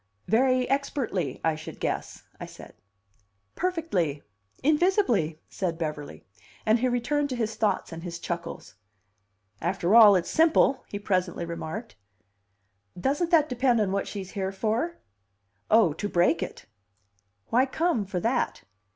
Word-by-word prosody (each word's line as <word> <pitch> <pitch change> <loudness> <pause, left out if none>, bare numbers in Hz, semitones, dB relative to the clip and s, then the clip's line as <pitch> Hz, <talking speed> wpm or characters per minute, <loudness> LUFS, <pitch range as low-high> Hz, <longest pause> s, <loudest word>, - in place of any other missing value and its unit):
"Very 255 +2 +3
expertly, 250 - -1
I 160 - +2
should 155 0 -9
guess," - - -3 0.2
I - - -6
said. - - -13 0.8
"Perfectly; 310 - -1 0.4
invisibly," 295 - +2
said 175 -4 -3
Beverly. 150 -3 -5 0.4
And 220 +2 +4
he 255 - +1
returned 285 +4 0
to 255 - -2
his 225 -2 -2
thoughts 215 -4 -1
and 165 0 -7
his 170 -1 -6
chuckles. 170 0 -6 0.9
"After 180 +2 0
all, 215 -3 +9
it's 180 -2 0
simple," 315 -4 +3
he 205 - -5
presently 185 -4 -1
remarked. 170 - -6 1.0
"Doesn't 290 - 0
that 320 -4 +4
depend 250 -2 +2
on 205 -3 +1
what 200 0 -1
she's 195 -2 -6
here 190 -2 -2
for?" 225 - -1 0.7
"Oh, 215 -8 +5
to 205 +6 -4
break 175 -2 +2
it." - - -6 0.8
"Why 255 +3 +3
come 320 -5 0
for 190 -2 -3
that?" 235 +6 -1
215 Hz, 135 wpm, -27 LUFS, 175-265 Hz, 1.0 s, all